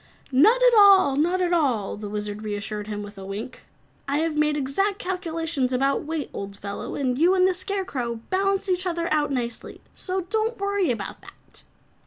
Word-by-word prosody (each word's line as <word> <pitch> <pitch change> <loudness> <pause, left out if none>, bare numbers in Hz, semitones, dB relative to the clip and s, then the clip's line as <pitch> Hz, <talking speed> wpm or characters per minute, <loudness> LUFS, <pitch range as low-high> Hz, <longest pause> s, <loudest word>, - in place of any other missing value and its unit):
"Not 435 - +5
at - - +6
all, 395 -9 +7
not 350 +6 +1
at 355 -1 +1
all," 255 - +1
the 205 0 -7
Wizard 210 0 -4
reassured 210 0 -4
him 210 -1 -4
with 205 -1 -10
a - - -8
wink. 200 +6 -7 0.5
"I 280 +1 0
have 320 0 0
made 300 0 +2
exact 385 +9 0
calculations 330 -8 -2
about 275 +3 +1
weight, 310 -2 -4
old 200 0 -6
fellow, 200 0 -6
and 255 -2 -1
you 355 +4 +4
and 370 0 +4
the 375 - +2
Scarecrow 360 - -2 0.2
balance 390 +1 +1
each 370 0 0
other 340 -1 -1 0.2
nicely. 240 -4 -4
So 375 0 -3
don't 440 +5 -1
worry 400 -2 0
about 235 - -4
that." - - -14
305 Hz, 180 wpm, -24 LUFS, 235-375 Hz, 0.5 s, all